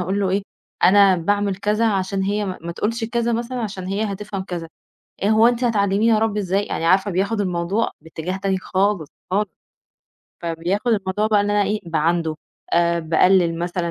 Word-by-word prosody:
أقول 190 +3 -1
له 195 -2 +1
إيه، 195 +1 +1 0.4
أنا 195 0 +6
باعمل 200 +2 0
كذا 210 +3 +1
عشان 195 0 -1
هي 205 +2 0
ما 185 -2 -4
ما 170 +1 -5
تقولش 225 +6 -2
كذا 235 +1 -1
مثلًا 240 +2 -2
عشان 195 -4 -5
هي 200 +3 -1
هتفهَم 200 -1 -5
كذا، 175 -3 -5 0.5
"إيه 200 - +2
هو 220 +1 +5
أنتِ 245 +1 -1
هتعلّميني 210 0 +2
أرَبّي 215 -1 +1
إزاي؟" 195 +1 0
يعني - - -3
عارفة 190 +3 +3
بياخد 200 +4 0
الموضوع 185 +3 0
باتجاه 160 +3 -5
تاني 195 -1 -1
خالص، 190 -4 0 0.2
خالص، 205 +2 +1 0.9
فبياخد 170 +7 -2
الموضوع 200 0 0
بقى 215 -1 +3
إن 205 0 0
أنا 205 0 +3
إيه، 205 +2 -1
باعاندُه 165 0 0 0.4
آآ، 170 0 +3
باقلّل 170 +1 +3
مثلًا 175 0 -2
195 Hz, 175 wpm, -21 LUFS, 180-210 Hz, 0.9 s, أنا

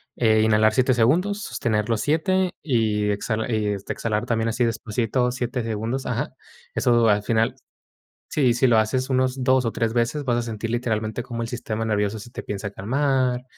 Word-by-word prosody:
eh, 110 -2 +3
inhalar 110 0 +4
7 130 +2 +3
segundos, 175 - +2
sostener 110 - -1
los 115 -2 +1
7 185 +4 +1
y 110 -7 +1
exhala 110 +3 -2
y 110 -2 0
este, 100 -1 -3
exhalar 105 -2 -2
también 115 -1 0
así 115 +2 0
despacito 115 +2 -1
7 125 0 -3
segundos. 115 +4 -3
Ajá. - - -3 0.4
Eso 120 -2 +3
al 105 0 +2
final 115 +3 +1 0.7
sí, 130 -5 +2
si 125 +2 +3
lo 115 -2 +4
haces 130 +5 0
unos 130 0 +1
2 130 -1 +4
o 115 - 0
3 115 0 -1
veces, 120 +5 0
vas 120 -2 +1
a - - +1
sentir 115 -1 -4
literalmente, 115 -1 -2
como 120 -2 -5
el 115 - -2
sistema 115 -2 -4
nervioso 105 0 0
se 120 +3 -11
te - - -6
empieza 105 0 -5
a - - -6
calmar, 130 +3 0
115 Hz, 190 wpm, -23 LUFS, 110-130 Hz, 0.7 s, inhalar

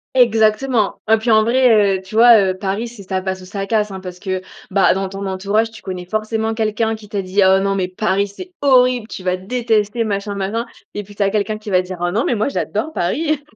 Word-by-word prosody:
Exactement 225 -1 +2
et 220 - +6
puis, 225 +1 0
en 220 0 +6
vrai, 225 -5 +4
heu, - - -9
tu 190 - -14
vois, 230 0 +7
heu, 190 -1 +1
Paris, 200 +4 -3
c'est 230 -3 -11
ça 190 0 -3
passe 190 -1 -3
ou - - -11
ça 195 0 -4
casse, 210 0 0
hein, 190 -1 -7
parce 180 -1 -9
que, 185 -1 -3 0.3
bah, 190 -2 +3
dans 195 0 -3
ton 195 +1 -6
entourage, 200 +4 0
tu 220 - -13
connais 180 -2 -6
forcément 220 +2 -2
quelqu'un 220 0 0
qui 215 -2 -10
t'as 200 -3 -2
dit: 190 +2 0
«Oh 190 0 +5
non 195 0 0
mais 185 -2 -1
Paris, 200 +1 0
c'est 360 - -11
horrible, 250 -4 +3
tu 185 - -8
vas 185 0 0
détester 225 +1 0
machin, 200 -1 -3
machin» 215 +5 -2 0.3
et 205 - -4
puis 205 +1 -15
tu 205 - 0
as 195 - +1
quelqu'un 215 0 -1
qui 215 -1 -8
va 185 0 +4
dire: 180 -1 -8
«Ah 175 - 0
non 220 +5 0
mais 240 - +1
moi 215 - 0
j'adore 260 +4 -3
Paris», 295 - -1
210 Hz, 245 wpm, -18 LUFS, 190-225 Hz, 0.3 s, vois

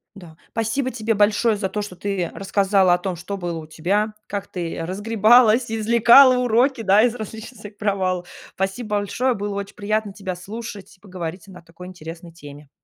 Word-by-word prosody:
Да, 170 -4 -13
спасибо 230 +4 -1
тебе 225 -1 -1
большое 210 +1 +2
за 195 -2 -1
то, 210 +2 -4
что 185 -4 -8
ты 195 -4 -2
рассказала 195 -2 +2
о - - +3
том, 180 -1 -4
что 190 +4 -6
было 175 -3 -4
у 155 - -10
тебя, 200 +7 -1
как 200 -1 -4
ты 170 -3 -5
разгребалась, 220 +4 +4
извлекала 235 +4 +6
уроки, 250 +1 +2
да, 205 +2 +5
из 245 -1 +2
различных 220 +1 -8
своих 205 -1 -11
провал. 185 -3 -1 0.3
Спасибо 210 +3 -2
большое, 250 +6 0
было 205 -1 -4
очень 200 0 -6
приятно 210 0 -2
тебя 190 -3 -5
слушать 205 +2 -9
и 185 - -32
поговорить 180 -1 -7
о - - -12
на 180 - -12
такой 170 +2 -13
интересной 170 -1 -10
теме. 145 -3 -13
200 Hz, 180 wpm, -22 LUFS, 180-220 Hz, 0.3 s, извлекала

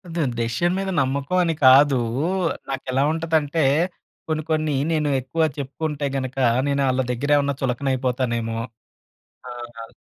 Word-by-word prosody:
Then 145 -7 0
decision 120 +10 0
మీద 195 0 -2
నమ్మకం 140 +6 -1
అని 165 - +1
కాదు. 135 +1 +7 0.7
నాకెలా 135 0 -1
ఉంటదంటే 160 -1 0 0.7
కొన్ని 155 -1 -1
కొన్ని 155 -1 +1 0.2
నేను 155 -2 +1
ఎక్కువ 160 +6 -1
చెప్పుకుంటే 145 +2 -3
గనుక 130 0 -4 0.3
నేను 140 0 +1
ఆళ్ళ 130 0 +1
దగ్గర 135 +4 -3
ఏమైనా 140 0 +1
చులకన 130 +1 -1
అయిపోతానేమో! 120 -3 -1 0.9
ఆహ్, 120 -1 -9
140 Hz, 125 wpm, -22 LUFS, 130-155 Hz, 0.9 s, కాదు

